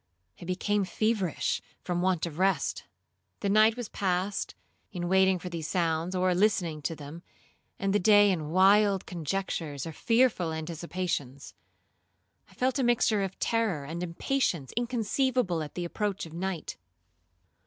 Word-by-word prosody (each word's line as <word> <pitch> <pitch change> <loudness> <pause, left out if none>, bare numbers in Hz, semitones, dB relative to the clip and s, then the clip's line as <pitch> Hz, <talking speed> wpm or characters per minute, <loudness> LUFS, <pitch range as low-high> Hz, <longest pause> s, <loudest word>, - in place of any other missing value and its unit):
I - - -7
became 200 +3 0
feverish 205 -3 0 0.2
from 175 -1 -1
want 185 -3 +1
of 165 -1 -7
rest. 195 +1 +1 0.6
The 200 - 0
night 215 +3 +5
was 245 -3 -4
passed 190 0 -2 0.4
in 175 -2 -3
watching 190 0 +4
for 180 - -8
these 165 -3 -4
sounds, 170 0 0
or 185 0 +2
listening 175 -5 +1
to 165 - -2
them, 150 +3 -9 0.6
and 195 -1 0
the 205 - +3
day 205 +1 +6
in 155 -5 -2
wild 195 +2 +4
conjectures 165 -4 -3
or 165 - -5
fearful 230 - +2
anticipations. 160 -4 -4 1.0
I - - -20
felt 255 +2 0
a - - +2
mixture 235 -3 +3
of 190 -1 -3
terror 215 -11 0
and 165 +4 -5
impatience 175 - -1
inconceivable 240 - 0
at 150 - -7
the 175 - -3
approach 200 +2 -2
of 160 - -11
night. 180 -1 -4
185 Hz, 145 wpm, -29 LUFS, 165-205 Hz, 1.0 s, day